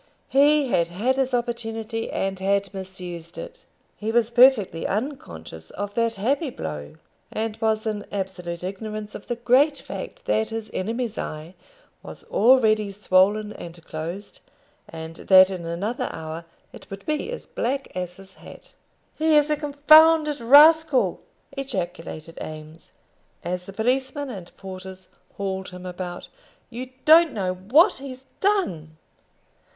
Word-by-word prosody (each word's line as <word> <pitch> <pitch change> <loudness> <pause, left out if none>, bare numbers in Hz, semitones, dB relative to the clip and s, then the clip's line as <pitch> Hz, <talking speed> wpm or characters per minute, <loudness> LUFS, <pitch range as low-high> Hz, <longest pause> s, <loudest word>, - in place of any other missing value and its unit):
He 285 0 +4
had 170 -7 +2
had 210 +10 0
his 265 -1 +1
opportunity, 225 -2 -3
and 195 -1 -2
had 200 0 0
misused 180 -3 -7
it. - - -9 0.3
He 215 +1 -3
was 235 0 +2
perfectly 235 -9 +4
unconscious 85 - -5
of 205 0 -5
that 230 0 0
happy 270 - 0
blow, 75 - -7 0.4
and 220 0 -3
was 220 0 +1
in 210 -2 -3
absolute 180 -3 -5
ignorance 210 +2 -6
of - - -10
the 240 - -2
great 260 +5 +3
fact - - -8
that 220 0 +1
his 225 -1 -5
enemy's 225 +3 -3
eye 155 +3 -6 0.5
was - - -10
already 220 -3 +4
swollen 205 +2 +2
and 170 -1 -11
closed, 170 +6 -7 0.5
and 160 0 -8
that 190 0 +6
in 175 -3 -5
another 195 +8 -3
hour 160 +1 -7 0.3
it - - -13
would 195 0 -9
be 305 +8 -2
as - - -6
black 270 +3 -3
as 180 -1 -4
his 190 0 -13
hat. - - -14 0.4
"He 315 0 +2
is 295 +1 +3
a - - +4
con 295 -1 -6
founded 310 -1 +7
rascal!" 295 +3 +6 0.3
ejaculated 175 - -5
Eames, 155 +1 -10 0.5
as 180 +1 -4
the 195 - -8
policemen 260 +5 -1
and 185 -6 -9
porters 190 -1 -9 0.3
hauled 190 -1 -3
him 180 0 -10
about. 180 -1 -6 0.4
"You 250 +2 -6 0.2
don't 325 +1 +7
know 185 -4 -1
what 245 - +4
he's 265 -1 -9
done." 180 - 0
210 Hz, 140 wpm, -24 LUFS, 180-260 Hz, 0.5 s, founded